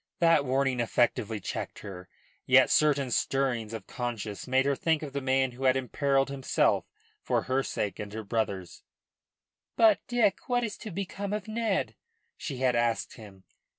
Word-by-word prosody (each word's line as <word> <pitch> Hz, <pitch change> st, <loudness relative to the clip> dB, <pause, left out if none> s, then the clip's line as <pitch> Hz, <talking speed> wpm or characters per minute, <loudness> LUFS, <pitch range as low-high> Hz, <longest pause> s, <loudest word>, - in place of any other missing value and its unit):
That 165 Hz, -4 st, +4 dB
warning 135 Hz, -1 st, +1 dB
effectively 115 Hz, -2 st, +1 dB
checked -, -, -5 dB
her. 90 Hz, -3 st, -9 dB, 0.4 s
Yet -, -, +6 dB
certain 140 Hz, -4 st, +3 dB
stirrings 125 Hz, -4 st, 0 dB
of 110 Hz, -4 st, -6 dB
conscience 115 Hz, -4 st, -5 dB
made 130 Hz, +1 st, +3 dB
her 140 Hz, 0 st, +2 dB
think 160 Hz, +2 st, 0 dB
of 140 Hz, -3 st, -6 dB
the 140 Hz, -, -2 dB
man 130 Hz, 0 st, +1 dB
who 130 Hz, +2 st, -6 dB
had 130 Hz, 0 st, +4 dB
imperilled 135 Hz, +2 st, +1 dB
himself 135 Hz, -1 st, +1 dB, 0.4 s
for -, -, 0 dB
her 130 Hz, +1 st, +1 dB
sake 105 Hz, -6 st, -3 dB
and 105 Hz, -1 st, -6 dB
her 110 Hz, +1 st, -5 dB
brother's. 100 Hz, -4 st, -3 dB, 0.9 s
"But, 220 Hz, -3 st, +5 dB
Dick, 235 Hz, -4 st, +1 dB
what 245 Hz, -1 st, +2 dB
is 220 Hz, -2 st, -3 dB
to 220 Hz, -, -8 dB
become 200 Hz, +2 st, -4 dB
of 210 Hz, -1 st, -3 dB
Ned?" 220 Hz, -3 st, -1 dB, 0.4 s
she 140 Hz, -6 st, -5 dB
had 125 Hz, -1 st, +2 dB
asked 120 Hz, -1 st, 0 dB
him. 100 Hz, -4 st, -13 dB
130 Hz, 165 wpm, -28 LUFS, 115-155 Hz, 0.9 s, Yet